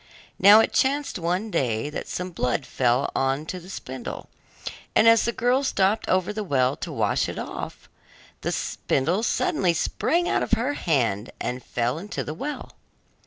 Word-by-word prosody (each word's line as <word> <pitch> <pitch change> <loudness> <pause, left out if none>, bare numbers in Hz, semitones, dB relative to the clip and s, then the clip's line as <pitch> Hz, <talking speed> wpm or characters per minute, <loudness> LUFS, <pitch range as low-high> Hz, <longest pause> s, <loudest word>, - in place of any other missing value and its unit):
Now 210 +2 +9
it - - -1
chanced 280 -4 +1
one 180 +6 -1
day 115 - 0
that - - -5
some 180 0 -4
blood 125 -4 -1
fell 125 +2 +1
on 135 +3 0
to 180 +3 -5
the 180 +1 -13
spindle, 130 -9 -7 0.7
and 220 - +5
as 230 -1 +6
the 235 - +1
girl 245 +4 +1
stopped 200 -4 +1
over 185 +2 +1
the 215 0 -3
well 135 -6 +1
to - - -5
wash - - 0
it - - -6
off, - - -6 0.5
the - - -1
spindle 170 +10 0
suddenly 230 - +1
sprang 345 - 0
out - - +1
of - - -3
her 255 +5 +2
hand 120 - 0
and 125 0 -3
fell 120 +5 -1
into 205 +4 -5
the 150 - -5
well. 290 - -6
180 Hz, 170 wpm, -25 LUFS, 130-225 Hz, 0.7 s, Now